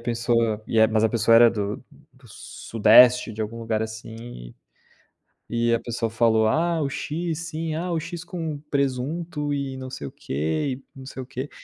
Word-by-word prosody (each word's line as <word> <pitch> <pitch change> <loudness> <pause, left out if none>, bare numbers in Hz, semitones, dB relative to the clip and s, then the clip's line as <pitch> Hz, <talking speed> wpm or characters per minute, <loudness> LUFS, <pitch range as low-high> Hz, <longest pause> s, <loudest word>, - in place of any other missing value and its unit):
pessoa 115 -2 0
e 115 - +2
a 110 - +6
mas 110 0 +2
a - - +4
pessoa 115 0 +4
era 120 0 +8
do 105 -2 -3 0.4
do - - -20
Sudeste, 115 +2 +4
de 110 - -7
algum 115 +2 -4
lugar, 110 -1 -1
assim, 110 0 -6
e 85 - -10 1.0
e 120 0 +1
a 115 - +2
pessoa 115 -1 -3
falou: 110 -1 +3
"Ah, 165 +5 +1
o 140 - -1
X 160 +3 -3
sim, 160 0 -3
ah, 175 +2 -3
o 165 - 0
X 170 +1 -6
com 165 -4 -5
presunto 145 +3 -1
e 135 -2 -3
não 130 0 -7
sei 70 - -6
o - - -9
quê, 80 - -2
e - - -12
não 130 - -10
sei 135 -1 -7
o - - -7
quê". 135 +1 -6
120 Hz, 195 wpm, -24 LUFS, 110-145 Hz, 1.0 s, era